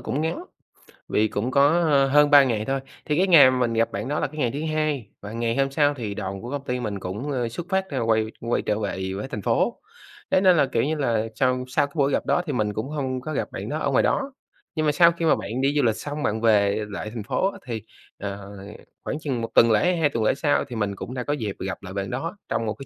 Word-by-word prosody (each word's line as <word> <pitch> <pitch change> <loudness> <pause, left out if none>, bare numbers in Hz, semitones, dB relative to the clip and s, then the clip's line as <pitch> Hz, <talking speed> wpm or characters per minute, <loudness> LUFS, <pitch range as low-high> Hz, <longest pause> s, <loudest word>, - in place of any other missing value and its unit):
cũng 140 - -2
ngắn, 165 - -2 0.7
vì 110 - +2
cũng 110 +4 -2
có 140 +1 +5 0.4
hơn 150 0 +6
3 145 -1 +8
ngày 110 -5 -1
thôi. 135 +2 -1 0.3
Thì 150 - 0
cái 190 +2 +3
ngày 150 -8 +8
mà 130 - 0
mình 120 -2 +1
gặp 115 0 +1
bạn 105 +4 -4
đó 150 +2 -1
là - - 0
cái 155 +3 -13
ngày 120 -5 +1
thứ 140 +4 -4
hai, 150 -8 -1
và 105 +1 -8
ngày 115 0 -1
hôm 135 0 +1
sau 145 +1 +3
thì 115 -7 -5
đoàn 95 -1 -5
của 120 - -7
công 140 -1 -4
ty 125 -2 -2
mình 105 -5 -3
cũng, 105 +11 -5
ơ, 120 -3 -1
xuất 165 +9 -6
phát, 190 -1 0
a, 135 -3 -2
quay 110 -1 +2
quay 115 +1 -1
trở 105 - -1
về 95 -2 -3
với 105 +7 -4
thành 110 -6 -5
phố. - - +1 0.5
Thế 185 - +4
nên 185 -2 +5
là, 145 - +4
kiểu 125 -3 0
như 155 +3 0
là, 115 -7 0
sau 125 +1 +1
sau 130 +2 +1
cái 140 - -21
buổi 140 -2 +2
gặp - - 0
đó - - +2
thì 150 - -3
mình 105 -4 0
cũng 110 +6 -4
hông 130 -4 -3
có 155 +5 -5
gặp - - -2
bạn - - -6
đó - - -2
ở - - 0
ngoài - - +3
đó. 275 0 0 0.4
Nhưng 155 -1 0
mà 150 - +4
sau 170 +3 +6
khi 170 0 -3
mà 160 - +5
bạn 120 +5 -4
đi 135 +1 +2
du 145 - +3
lịch 115 -3 +2
xong 145 0 -5
bạn 110 +1 -1
về 105 -2 +3
lại 105 +1 -5
thành 115 -3 -5
phố 190 - 0
á - - -11
thì, 115 -4 -4 0.4
ờ, 100 0 -6 0.5
khoảng 150 - -3
chừng 135 -6 -3
1 115 - -3
tuần 115 -1 +6
lễ, 175 +12 +3
2 160 -3 +2
tuần 115 -5 -2
lễ - - +4
sau 145 0 +1
thì 125 - -7
mình 105 -3 -1
cũng 120 - -7
đã 125 -1 -3
có 145 - -1
dịp 110 -9 -3
gặp 95 +1 -5
lại 95 0 -8
bạn 100 -1 -3
đó, 165 +10 -4
trong 115 - -1
một 110 - -1
cái 135 +6 -11
125 Hz, 280 wpm, -24 LUFS, 110-145 Hz, 0.7 s, 3